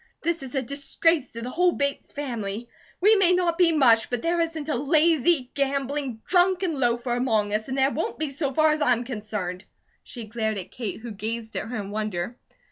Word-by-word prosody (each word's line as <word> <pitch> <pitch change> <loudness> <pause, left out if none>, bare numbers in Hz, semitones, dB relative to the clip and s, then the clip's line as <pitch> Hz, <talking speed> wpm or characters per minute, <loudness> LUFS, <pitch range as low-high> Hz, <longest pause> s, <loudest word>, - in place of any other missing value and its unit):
This 335 0 0
is 270 +1 -8
a 265 - 0
disgrace 280 +3 +1
to 230 0 -6
the 250 - -4
whole 360 +3 +3
Bates 280 0 -2
family. 235 -6 -4 0.3
We 425 +4 +6
may 365 -2 +4
not 355 -1 +1
be 350 -2 +5
much, 240 -8 +4
but 245 -2 -2
there 340 +1 +1
isn't 325 -3 -3
a 305 - 0
lazy, 300 0 +2
gambling, 275 -3 -2
drunken 360 -3 +2
loafer 240 0 +1
among 220 -5 +1
us, 215 +1 -1
and 265 0 -3
there 270 +1 +3
won't 320 - -3
be 310 -2 -2
so 275 0 -2
far 310 +3 +4
as 305 0 -1
I'm 245 -4 +3
concerned." 210 -6 -5 0.4
She 240 - -9
glared 220 -1 -2
at 185 - -6
Kate 220 -4 -5
who 235 0 -7
gazed 220 +2 -5
at - - -2
her 245 +1 -4
in 200 -1 -6
wonder. 210 0 -3
265 Hz, 205 wpm, -25 LUFS, 225-315 Hz, 0.4 s, We